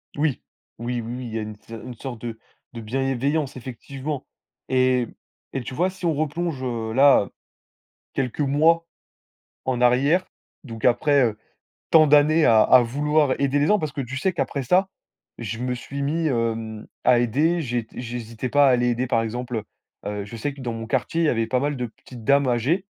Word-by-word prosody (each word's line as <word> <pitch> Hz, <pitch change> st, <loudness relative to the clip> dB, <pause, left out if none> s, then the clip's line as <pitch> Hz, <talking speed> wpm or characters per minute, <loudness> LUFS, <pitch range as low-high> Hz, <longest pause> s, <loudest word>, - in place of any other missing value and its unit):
Oui, 145 Hz, -2 st, 0 dB, 0.4 s
oui, 120 Hz, 0 st, -2 dB
oui, 115 Hz, +2 st, -5 dB
oui, 125 Hz, -, -6 dB
il 110 Hz, -, -8 dB
y 115 Hz, -, -1 dB
a -, -, -3 dB
une 105 Hz, 0 st, -5 dB
s 105 Hz, -, -23 dB
une 115 Hz, +2 st, -7 dB
sorte 120 Hz, -2 st, -7 dB
de 115 Hz, -2 st, -6 dB, 0.3 s
de 115 Hz, -, -7 dB
bienveillance 135 Hz, +5 st, -1 dB
effectivement, 135 Hz, +3 st, -6 dB, 0.4 s
et 130 Hz, -1 st, +3 dB
m -, -, -9 dB, 0.4 s
et 135 Hz, -, -2 dB
tu 125 Hz, -, -7 dB
vois? 180 Hz, +7 st, +1 dB
Si 185 Hz, -1 st, -8 dB
on 165 Hz, -, +2 dB
replonge, 155 Hz, 0 st, -2 dB
heu, 115 Hz, -3 st, -3 dB
là, 135 Hz, -6 st, +5 dB, 0.9 s
quelques 135 Hz, +1 st, -2 dB
mois 160 Hz, +4 st, +3 dB, 0.8 s
en 125 Hz, -2 st, -1 dB
arrière, 140 Hz, +9 st, +3 dB, 0.4 s
donc 115 Hz, -4 st, -6 dB
après, 135 Hz, +3 st, +4 dB
heu, 105 Hz, -2 st, -2 dB, 0.5 s
tant 155 Hz, -2 st, +7 dB
d'années 150 Hz, +2 st, +5 dB
à 110 Hz, -1 st, +6 dB
à 130 Hz, +2 st, +7 dB
vouloir 145 Hz, +3 st, +1 dB
aider 140 Hz, +1 st, +2 dB
les 145 Hz, -, +2 dB
gens, 210 Hz, -1 st, +4 dB
parce 155 Hz, -2 st, -3 dB
que 145 Hz, -, -4 dB
tu 130 Hz, +2 st, -5 dB
sais 190 Hz, +6 st, 0 dB
qu'après 140 Hz, -5 st, -2 dB
ça, 185 Hz, +8 st, +3 dB, 0.5 s
je 115 Hz, 0 st, -5 dB
me 125 Hz, 0 st, -1 dB
suis 140 Hz, +3 st, -6 dB
mis, 160 Hz, +3 st, 0 dB
hem, 115 Hz, -3 st, -2 dB, 0.2 s
à 125 Hz, -2 st, +5 dB
aider, 150 Hz, +9 st, +2 dB
j'ai 120 Hz, -5 st, -2 dB
t -, -, -11 dB
j'hésitais 120 Hz, 0 st, -5 dB
pas 145 Hz, -1 st, +5 dB
à 130 Hz, -, +6 dB
aller 125 Hz, 0 st, +2 dB
aider, 120 Hz, +1 st, 0 dB
par 115 Hz, -3 st, +2 dB
exemple, 120 Hz, +1 st, -3 dB, 0.5 s
heu -, -, -2 dB
heu, 105 Hz, -1 st, -4 dB
je 115 Hz, +3 st, -9 dB
sais 140 Hz, +6 st, -3 dB
que 140 Hz, -, -11 dB
dans 120 Hz, -2 st, -3 dB
mon 115 Hz, 0 st, -5 dB
quartier, 135 Hz, +7 st, 0 dB
il -, -, +3 dB
y -, -, +4 dB
avait 115 Hz, -2 st, 0 dB
pas 125 Hz, +2 st, +1 dB
mal 145 Hz, 0 st, -1 dB
de 125 Hz, -, -2 dB
petites 115 Hz, +1 st, -12 dB
dames 140 Hz, +2 st, +3 dB
âgées, 130 Hz, -, +1 dB
130 Hz, 205 wpm, -23 LUFS, 115-145 Hz, 0.9 s, tant